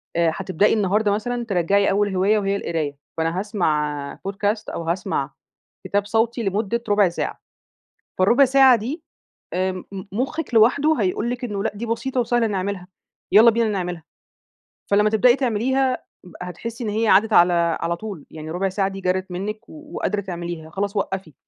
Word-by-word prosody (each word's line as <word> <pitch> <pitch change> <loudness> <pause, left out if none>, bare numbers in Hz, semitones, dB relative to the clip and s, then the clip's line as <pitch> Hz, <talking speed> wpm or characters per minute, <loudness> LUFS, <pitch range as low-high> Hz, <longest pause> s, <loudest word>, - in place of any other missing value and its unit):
آآ 170 -1 +3
هتبدئي 195 +1 +1
النهارده 210 0 +2
مثلًا 240 +4 -2
ترَجّعي 200 0 +2
أول 205 0 +1
هواية 200 +4 +3
وهي 200 -1 0
القراية، 160 -7 -3 0.2
فأنا 165 +2 0
هأسمع 150 -8 -1
Podcast 205 +2 -1
أو 170 - -4
هأسمع 165 -4 -2 0.6
كتاب 205 0 0
صوتي 225 +3 0
لمدة 210 +3 -1
ربع 205 -2 +4
ساعة، 170 - -4 0.8
فالربع 235 +9 +5
ساعة 265 -1 +6
دي 260 +9 -5 0.5
آآ 185 +1 0
م 185 -1 -8 0.3
مخِّك 265 +7 -3
لوحده 280 +8 +4
هيقول 205 +4 0
لِك 245 +1 -4
إنه 205 -4 -3
لأ - - 0
دي 220 +4 -5
بسيطة 250 +3 -2
وسهلة 240 -1 +2
نعملها 190 -2 -3 0.5
يالّا 225 +3 +8
بينا 230 0 +1
نعملها، 180 -5 -3 0.9
فلمّا 210 +1 +4
تبدئي 240 +3 +4
تعمليها 260 +1 0 0.4
هتحسّي 230 +7 -6
إن 220 - -2
هي 220 +2 0
عدِّت 210 +3 +4
على 175 -1 +6 0.3
على 170 +1 0
طول، 200 -6 -8
يعني 155 0 -8
ربع 190 +3 -1
ساعة 195 +1 0
دي 195 0 -6
جرِت 185 0 -1
منِك 205 +4 -5
و 305 0 -13
وقادرة 210 -1 -1
تعمليها 170 -4 -6
خلاص 200 +4 -3
وقّفي، 190 -5 -3
200 Hz, 160 wpm, -22 LUFS, 185-230 Hz, 0.9 s, يالّا